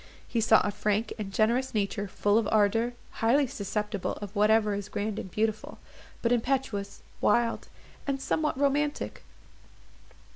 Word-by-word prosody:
He 235 - 0
saw 220 0 +6
a 205 - 0
frank 210 +2 -1
and 200 -2 -4
generous 235 +5 +1
nature, 200 0 -1
full 205 +3 +2
of 225 - -1
ardour, 225 +3 +3 0.3
highly 260 +6 +4
susceptible 210 -3 -3
of 205 0 -8
whatever 210 0 +4
is 200 0 -4
grand 210 +1 -2
and - - -6
beautiful, 215 +2 -2 0.5
but 235 - +2
impetuous, 240 -5 -1 0.2
wild, 230 +2 +2 0.4
and 275 -1 0
somewhat 300 +1 0
romantic. 290 +1 0
220 Hz, 140 wpm, -28 LUFS, 205-240 Hz, 0.5 s, saw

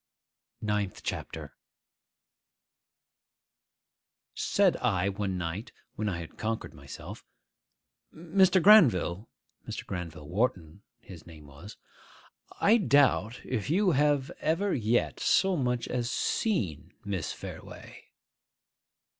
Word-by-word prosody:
NINTH 105 -3 -2
CHAPTER - - -5 2.8
SAID - - +2
I, 95 +2 +1
one 100 -1 -3
night, 90 +7 -4 0.2
when 105 0 -2
I 90 - -3
had 85 -2 -9
conquered 110 0 -3
myself, - - -10 0.9
'Mr. 180 +2 +2
Granville,'—Mr. 115 - +3
Granville 85 -5 -6
Wharton 95 -2 -2 0.2
his 85 -4 -13
name 80 -3 -13
was,—'I 95 - -3
doubt 130 - +2
if 125 -2 -3
you 185 +3 +3
have 145 0 +2
ever 185 +6 0
yet 120 -1 0
so 190 -1 +3
much 125 -5 -1
as 120 -1 -2
seen 120 - -1
Miss 95 -7 -3
Fareway. - - -10
110 Hz, 95 wpm, -29 LUFS, 90-150 Hz, 2.8 s, Granville,'—Mr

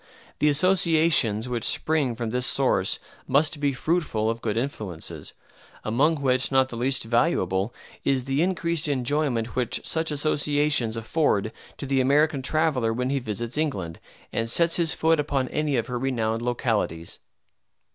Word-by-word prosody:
The 150 - +3
associations 160 - +2
which 120 -3 -3
spring 150 -6 +3
from 115 -1 -4
this 125 +1 0
source 125 -8 +1 0.3
must 145 +2 +2
be 145 -1 +1
fruitful 130 -6 -1
of 115 0 -7
good 110 -1 -2
influences; 105 - -3 0.5
among 140 +9 +2
which 130 -3 +1
not 130 -1 +3
the 120 - -7
least 130 +3 0
valuable 115 - 0 0.3
is 135 -2 +1
the 135 +3 -1
increased 170 -3 0
enjoyment 130 -3 -1
which 125 0 -1
such 160 0 0
associations 145 -4 +1
afford 110 -4 0 0.3
to - - -5
the 135 -1 +1
American 145 +2 +2
traveller 140 -5 +1
when 125 +3 -2
he 140 - 0
visits 120 +3 -4
England, 95 - -3 0.3
and 115 0 -1
sets 170 +7 +2
his 165 -2 +1
foot 160 0 +2
upon 140 -3 -1
any 150 -3 -1
of 115 - 0
her 125 -1 -4
renowned 115 -3 -1
localities. 115 - -2
130 Hz, 150 wpm, -25 LUFS, 115-150 Hz, 0.5 s, The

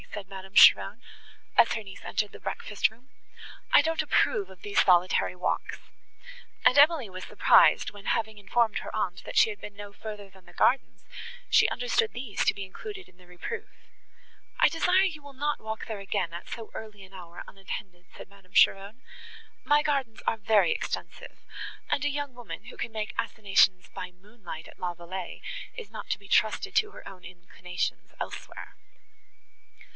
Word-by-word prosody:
said 205 -2 -6
Madame 190 0 -10
Cheron, - - +7 0.6
as - - +6
her 220 - -3
niece 195 -2 -11
entered 210 -2 -1
the - - -10
breakfast 205 - -1
room. 240 +4 -22 0.6
"I - - +8
don't 325 +2 0
approve 420 -6 +1
of - - -15
these 410 0 +2
solitary 180 0 +3
walks." 180 - -2 0.9
And 255 - +6
Emily 290 -5 +5
was 185 0 -8
surprised, - - +5
when, 205 -1 -13
having 220 -2 -1
informed 220 +3 +1
her - - -8
aunt, 185 -5 -2
that - - -6
she 220 - +6
had 205 - -10
been 210 - -9
no 205 0 -9
further 210 -2 -8
than 190 -1 -20
the - - -16
gardens, 260 +1 +1 0.4
she - - +5
understood 460 -2 0
these 240 -5 -3
to - - +4
be 195 - -6
included 380 - -9
in 180 - -23
the 180 -1 -19
reproof. 180 - -6 0.9
"I - - +7
desire 360 +4 +3
you 315 -6 -3
will 285 -1 -12
not 290 +2 -2
walk 220 0 -5
there 220 -3 -5
again 190 -3 -2
at 170 - -8
so 225 -2 -7
early 210 -2 -9
an 190 0 -15
hour 175 -2 -9
unattended," 190 -2 -8
said - - -10
Madame 195 -1 -21
Cheron; 195 +5 +3 0.6
"my 295 0 +4
gardens 275 -7 -1
are 225 - +2
very 215 - +3
extensive; 460 - -6 0.5
and 280 - +1
a 290 - +2
young 285 -1 -3
woman, 245 -1 -9
who - - -10
can - - -4
make 220 +1 -4
assignations 195 -3 +2
by 180 - -6
moonlight 195 -3 -11
at - - -16
La 180 -1 -2
Vallée, 175 +1 -7 0.3
is 465 -3 -9
not - - -8
to - - -1
be - - -15
trusted - - +1
to 425 -1 +3
her - - -12
own 185 -2 -11
inclinations 180 0 -5
elsewhere." - - -7
210 Hz, 180 wpm, -28 LUFS, 190-270 Hz, 0.9 s, I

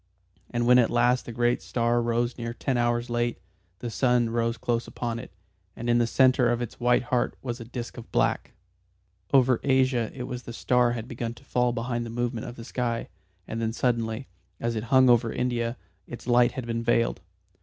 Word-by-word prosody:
And 120 0 -1
when 125 +1 +7
at 120 - +3
last 120 +1 +2
the - - -4
great 120 +1 +1
star 120 0 +1
rose 120 +1 0
near 115 -1 -5
ten 135 0 -1
hours 120 0 +1
late, 120 0 0 0.4
the 120 - -4
sun 120 -2 +2
rose 115 0 0
close 120 -1 -1
upon 115 -1 -4
it, 125 - -10 0.4
and 120 - -6
in 120 - +4
the 120 - +2
centre 130 0 +4
of 120 - 0
its 120 -2 -6
white 120 +1 +3
heart 125 0 0
was 120 -1 -4
a 115 - -7
disc 120 +1 -7
of 120 - -10
black. - - 0 0.8
Over 130 -3 +4
Asia 130 -4 +2
it 125 - -5
was 125 0 -5
the 120 - -9
star 125 0 +2
had 115 -1 -5
begun 120 -2 -4
to 130 - -17
fall 125 -2 +1
behind 120 0 -2
the 115 - -6
movement 120 +1 -3
of 120 - -7
the 115 - -9
sky, 120 -2 -2 0.4
and 115 - -4
then 115 0 -1
suddenly, 115 0 -1 0.3
as 115 0 -1
it 110 +1 -3
hung 130 +1 +5
over 120 -2 +4
India, 120 -1 -1 0.3
its 120 - -9
light 120 0 +4
had 130 -4 -5
been 115 0 -2
veiled. 115 0 +1
120 Hz, 205 wpm, -26 LUFS, 115-125 Hz, 0.8 s, when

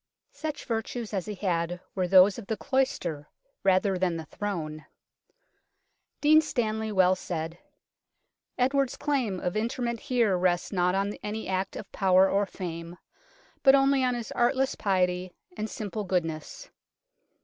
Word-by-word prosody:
Such 295 0 -5
virtues 225 0 -3
as 190 -1 -2
he 210 - -4
had 175 -2 -1
were 185 -2 0
those 190 +3 +6
of 210 - -10
the 220 - -2
cloister 220 - -1 0.3
rather 190 0 +3
than 180 -2 +1
the 160 - -6
throne. 155 -6 -5 1.3
Dean 310 +1 +6
Stanley 220 -7 -2
well 185 -2 +4
said: 165 -2 -4 0.5
" - - -54
Edward's 265 +1 +1
claims 245 -11 -1
of 180 - -1
interment 235 +2 -1
here 245 -8 +1
rest 180 +1 0
not 180 0 +2
on 200 +1 0
any 215 +1 -4
act 190 +1 -2
of 205 - -8
power 190 -1 +4
or 200 +1 +1
fame, 170 -2 -6 0.6
but 270 0 +7
only 275 -1 +3
on 250 -1 +1
his 235 -2 -5
artless 265 +3 +1
piety, 180 -2 0 0.2
and 215 +1 -3
simple 210 0 -4
goodness. 175 - -3
200 Hz, 145 wpm, -28 LUFS, 180-240 Hz, 1.3 s, but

